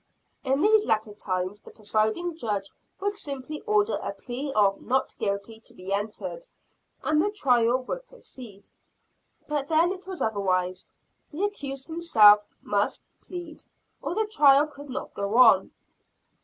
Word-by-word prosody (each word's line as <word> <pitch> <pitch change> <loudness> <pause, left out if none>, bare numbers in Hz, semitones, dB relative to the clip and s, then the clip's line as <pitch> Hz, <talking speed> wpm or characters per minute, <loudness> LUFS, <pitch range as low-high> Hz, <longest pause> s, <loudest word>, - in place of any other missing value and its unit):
In 270 +1 +1
these 425 +2 +4
later 220 -2 0
times 185 0 -3
the - - -14
presiding 220 +11 -1
Judge 210 -8 -3 0.3
would 405 +1 -1
simply 290 -3 -5
order 425 0 +2
a - - -3
plea 270 +3 -5
of 200 -3 +3
"not 265 +2 0
guilty" 200 +2 -2
to - - -16
be 185 +2 -5
entered, 215 - -4 0.6
and 310 0 +2
the 410 - +1
trial 255 - +2
would - - -5
proceed. 240 - -10 0.8
But 290 -2 -1
then 330 +2 +3
it 380 0 -8
was 375 -2 -5
otherwise 185 -4 -1 0.4
the 320 +6 -4
accused 275 -10 -3
himself 220 -12 +6 0.2
must - - -1
plead, 345 -3 -8 0.4
or - - -3
the 440 - +1
trial 295 -9 +5
could 290 -1 -12
not 260 - -5
go 200 +3 -2
on. 225 -7 +6
265 Hz, 145 wpm, -26 LUFS, 210-335 Hz, 0.8 s, himself